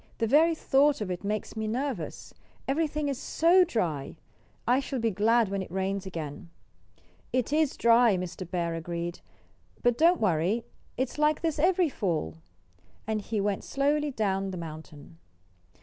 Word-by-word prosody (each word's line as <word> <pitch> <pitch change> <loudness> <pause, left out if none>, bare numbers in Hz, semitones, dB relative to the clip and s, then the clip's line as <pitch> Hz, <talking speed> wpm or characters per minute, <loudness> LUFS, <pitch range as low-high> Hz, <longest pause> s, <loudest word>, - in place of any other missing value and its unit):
The 230 - +1
very 315 +8 +4
thought 285 -1 +3
of 205 -4 -3
it 180 +1 -5
makes 210 +2 -3
me 220 0 -2
nervous. 240 - -4 0.3
Everything's 290 -2 -1
so 345 +5 +4
dry! 170 - -2 0.5
I 250 +2 +4
shall 275 0 -4
be 230 -2 0
glad 220 +2 +3
when 195 0 -2
it 190 - -7
rains 190 +1 -2
again." 165 -1 -6 0.8
"It 255 +2 0
is 310 -2 +2
dry," 230 -3 +5
Mr. 180 0 -6
Bear 170 -2 -1
agreed. 170 +1 -4 0.6
"But 245 -1 +2
don't 340 +2 +5
worry. 190 +4 +1 0.3
It's 260 +3 -2
like 300 0 +2
this 320 -3 -1
every 355 +2 +3
fall." 160 - -2 0.7
And 215 -1 -1
he 215 +1 -3
went 200 -1 -1
slowly 295 +2 0
down 195 -6 -1
the 185 - -5
mountain. 160 0 -10
220 Hz, 150 wpm, -28 LUFS, 180-280 Hz, 0.8 s, dry